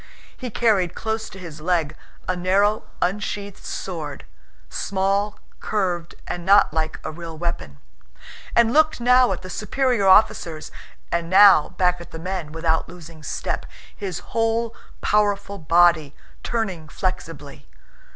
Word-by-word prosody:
He 255 - -6
carried 205 -6 +1
close 220 0 -3
to 195 - -12
his 165 -4 -9
leg 165 -3 0 0.3
a 185 - 0
narrow 195 +4 +2 0.2
unsheathed 200 +1 -3
sword 155 - -5 0.4
(small, 200 +2 -1 0.2
curved, 180 -5 -2
and 175 - -5
not 195 -3 +5
like 155 0 -2
a - - -4
real 165 0 -8
weapon) 160 - -4 0.8
and 235 0 +4
looked 310 -1 +4
now 250 -1 +5
at 185 0 -4
the 185 - -8
superior 240 -1 0
officers 170 -5 +3 0.4
and 170 -1 -1
now 190 -3 +7
back 180 -1 +2
at 170 - -11
the - - -8
men 175 -2 -4
without 160 0 0
losing 165 -2 -12
step, - - -3 0.3
his 190 -5 -4 0.2
whole 225 0 0 0.3
powerful 200 -1 +1
body 165 -2 +3 0.3
turning 190 -10 -3
flexibly. 165 -7 -5
185 Hz, 130 wpm, -23 LUFS, 165-210 Hz, 0.8 s, now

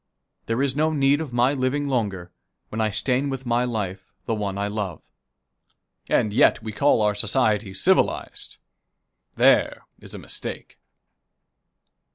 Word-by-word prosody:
There 115 +4 0
is 135 -2 0
no 155 +2 +2
need 145 0 +2
of 155 -5 -6
my 120 +3 +2
living 140 +2 -1
longer, 100 -9 -2 0.4
when 110 - -3
I 110 - +1
stain 125 +6 0
with 135 -1 -5
my 120 0 +1
life 100 -5 -4
the - - -1
one 100 -3 -3
I 100 0 -1
love." 100 -5 -4 1.1
And 105 - +1
yet 110 - +4
we 110 - -5
call 125 0 +2
our 105 0 +2
society 105 -1 +1
civilized. 95 - +1 0.8
There - - +3
is - - -11
a - - -6
mistake. - - -6
115 Hz, 145 wpm, -23 LUFS, 105-135 Hz, 1.1 s, yet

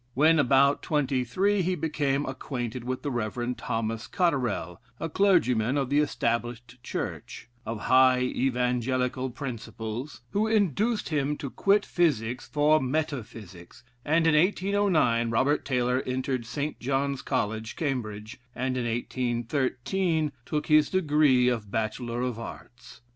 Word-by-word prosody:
When 155 +4 +5
about 140 +1 +4
twenty 135 -4 0
three, 195 - +1
he 185 +1 0
became 145 -3 -1
acquainted 125 -2 -5
with 130 +1 -4
the 145 - -2
Rev. 120 +1 -2
Thomas 115 0 -3
Cotterell, 125 - -1 0.2
a 165 - -2
clergyman 145 - +2
of 135 -1 -1
the 145 - +4
Established 120 -3 -2
Church, 120 - -6 0.2
of 115 -2 -4
high 130 0 +5
evangelical 125 0 0
principles, 120 0 -6
who 215 +2 +1
induced 215 - +1
him 150 -1 0
to 140 - -6
quit 200 +1 +2
physic 125 -8 0
for 150 +1 +2
metaphysics, 120 - -5 0.2
and 165 +2 +2
in 165 - +4
1809 175 - +2
Robert 135 +6 +1
Taylor 125 -1 +1
entered 130 -2 -2
Saint 145 +4 -3
John's 135 +1 -1
College, 110 +1 -2
Cambridge, 110 -7 -4 0.2
and 130 +1 -1
in 125 - -1
1813 130 - -1 0.2
took 150 -1 -1
his 155 -1 +4
degree 150 -8 +3
of 115 -5 -1
Bachelor 115 +3 -2
of 125 -3 -3
Arts. 125 +1 -11
130 Hz, 130 wpm, -27 LUFS, 120-150 Hz, 0.2 s, When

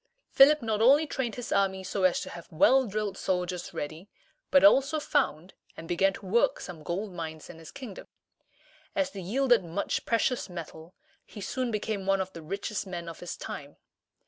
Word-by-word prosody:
Philip 285 0 +6
not 220 -1 0
only 280 +7 +6
trained 260 -6 -3
his 245 - -6
army 190 -1 +1
so 190 0 -1
as 185 - +3
to - - -7
have 170 - -10
well 255 +11 +4
drilled 205 -1 -3
soldiers 180 -1 -2
ready, 155 +7 -6 0.4
but 280 0 +5
also 300 +1 +5
found 195 - 0 0.2
and 165 - -8
began 190 +3 +2
to 200 - -10
work 235 +8 +2
some 175 -4 -8
gold 185 +5 -4
mines 160 -2 -7
in 165 - -14
his 160 - -11
kingdom. 255 -8 -9 0.9
As 280 -1 0
they 195 - -7
yielded 240 +3 +2
much 170 +4 -3
precious 235 0 +1
metal, 165 -1 -9 0.3
he 215 - -12
soon 255 +5 -2
became 210 -3 -3
one 195 0 +3
of 190 0 -3
the 165 - -8
richest 195 +4 -4
men 175 -2 -6
of 165 - -8
his 175 - -6
time. 145 0 -8
195 Hz, 185 wpm, -28 LUFS, 175-240 Hz, 0.9 s, Philip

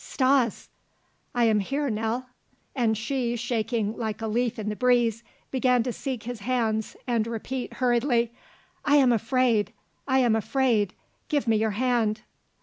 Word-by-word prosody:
"Stas!" 260 -4 +1 0.7
"I 240 - +3
am 220 -2 +4
here, 275 +8 -1
Nell." 225 +4 -2 0.5
And 225 -4 +1
she, 240 +2 -1
shaking 230 -2 -1
like 220 -3 -3
a 225 - -4
leaf 235 +2 0
in 210 -1 -3
the 210 - -3
breeze, 240 -2 +2 0.3
began 250 -2 +2
to 245 0 -3
seek 260 -3 -4
his 240 0 -5
hands 220 -2 -1
and 230 -3 0
repeat 240 +3 -4
hurriedly: 240 -1 +1 0.5
"I 290 - +3
am 265 -4 +5
afraid! 230 -1 +1 0.3
I 265 -1 +3
am 240 -4 +4
afraid! 225 -3 +1 0.3
Give 290 -5 0
me 225 -1 +4
your 215 -2 0
hand!" 235 -3 +1
235 Hz, 150 wpm, -26 LUFS, 220-255 Hz, 0.7 s, am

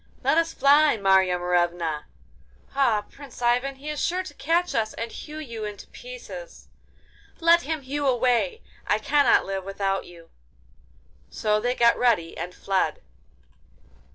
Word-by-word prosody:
'Let 275 +4 +3
us 330 0 0
fly, 290 -2 +4
Marya 190 -2 +3
Morevna!' 175 -3 0 0.7
'Ah, 235 -7 +2
Prince 280 -3 -12
Ivan! 250 +3 +1
he 275 +3 -12
is 300 -1 -2
sure 365 +2 0
to 315 - -10
catch 330 +6 0
us 220 -1 -1
and 230 0 -5
hew 305 0 -9
you 235 -8 -6
in 210 -1 -5
pieces.' - - -11 0.7
'Let 335 +1 +5
him 315 0 -3
hew 280 +2 -2
away! 255 - +1 0.2
I - - +3
cannot 285 0 +3
live 195 -1 -3
without 195 0 -2
you. 170 -1 -15 1.0
So 210 0 0
they 245 +3 -1
got 235 -1 +4
ready 215 -10 +2
and 180 +1 -6
fled. 195 -1 -1
245 Hz, 145 wpm, -25 LUFS, 195-300 Hz, 1.0 s, Let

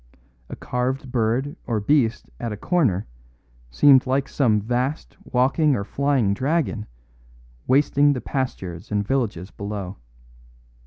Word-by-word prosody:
A - - -6
carved 130 +1 -3
bird 125 +4 0
or 115 -2 0
beast 115 +1 +1
at 115 - -3
a 105 - -5
corner 120 - +1 0.6
seemed 135 - +5
like 135 +1 +1
some 115 -7 +2
vast 125 +7 -2
walking 135 +4 +2
or 100 - -2
flying 135 -3 +1
dragon 135 -2 -1 0.8
wasting 145 +1 +4
the 130 - -3
pastures 95 - -4
and 105 0 0
villages 110 -8 -2
below. 100 -2 -6
125 Hz, 120 wpm, -23 LUFS, 105-140 Hz, 0.8 s, seemed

